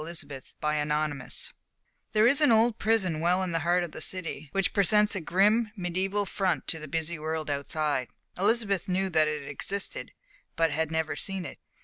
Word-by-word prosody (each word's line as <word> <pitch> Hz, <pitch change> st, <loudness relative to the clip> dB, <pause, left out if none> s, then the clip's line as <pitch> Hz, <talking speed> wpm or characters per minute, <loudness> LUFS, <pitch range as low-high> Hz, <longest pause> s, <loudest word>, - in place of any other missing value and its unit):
Chapter 150 Hz, -4 st, -6 dB, 0.2 s
XXXII 150 Hz, -2 st, -1 dB, 0.6 s
There 215 Hz, +1 st, +5 dB
is 275 Hz, +5 st, +5 dB
an 295 Hz, -, +5 dB
old 225 Hz, 0 st, +4 dB
prison 200 Hz, -7 st, +1 dB
well 180 Hz, +3 st, +2 dB
in 185 Hz, -, -2 dB
the 165 Hz, -, +1 dB
heart 175 Hz, +3 st, +2 dB
of 170 Hz, -, -5 dB
the -, -, -8 dB
city, 165 Hz, -5 st, -3 dB
which 195 Hz, -2 st, 0 dB
presents 210 Hz, +1 st, +4 dB
a 190 Hz, -, -2 dB
grim, 210 Hz, +7 st, +3 dB
mediæval 190 Hz, +3 st, -1 dB
front 185 Hz, -9 st, -1 dB
to 160 Hz, -, -2 dB
the 155 Hz, -, -8 dB
busy 165 Hz, +2 st, -2 dB
world 155 Hz, -1 st, -3 dB
outside. 145 Hz, -2 st, -1 dB, 0.3 s
Elizabeth 200 Hz, -1 st, +1 dB
knew 190 Hz, +1 st, 0 dB
that 155 Hz, -2 st, +4 dB
it 150 Hz, -2 st, -3 dB
existed, 200 Hz, -, -2 dB, 0.4 s
but 165 Hz, -1 st, +2 dB
had 160 Hz, 0 st, 0 dB
never 160 Hz, -1 st, -1 dB
seen 195 Hz, -2 st, -3 dB
it. 135 Hz, -, -8 dB
175 Hz, 175 wpm, -28 LUFS, 155-200 Hz, 0.6 s, There